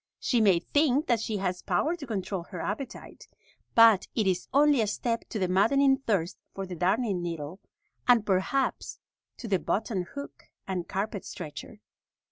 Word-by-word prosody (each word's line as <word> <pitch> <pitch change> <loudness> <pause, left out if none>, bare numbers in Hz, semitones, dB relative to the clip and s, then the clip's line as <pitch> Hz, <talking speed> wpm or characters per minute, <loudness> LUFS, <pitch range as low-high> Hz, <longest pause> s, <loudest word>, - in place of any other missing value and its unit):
She 240 -3 +1
may 195 -5 +5
think 290 - +2
that 235 -6 +2
she 220 -1 -2
has 180 -2 -2
power 330 +3 0
to 300 -6 -9
control 195 -4 -3
her 180 -2 -8
appetite, 220 +10 -6 0.5
but 225 -4 +6
it 220 - +1
is 185 -2 0
only 285 -2 +4
a 215 - +1
step 230 +2 -2
to - - -4
the 190 -3 0
maddening 270 +9 +3
thirst 195 -9 -1 0.2
for 195 - -4
the 185 - -7
darning 190 +3 +1
needle, 165 0 -5 0.5
and 240 -4 +5
perhaps 200 +8 0 0.4
to 235 - -7
the 195 -3 +1
button 195 -3 -2
hook 280 0 -8 0.2
and 185 -3 -3
carpet 200 0 -3
stretcher. 155 -5 -8
205 Hz, 165 wpm, -28 LUFS, 185-245 Hz, 0.5 s, but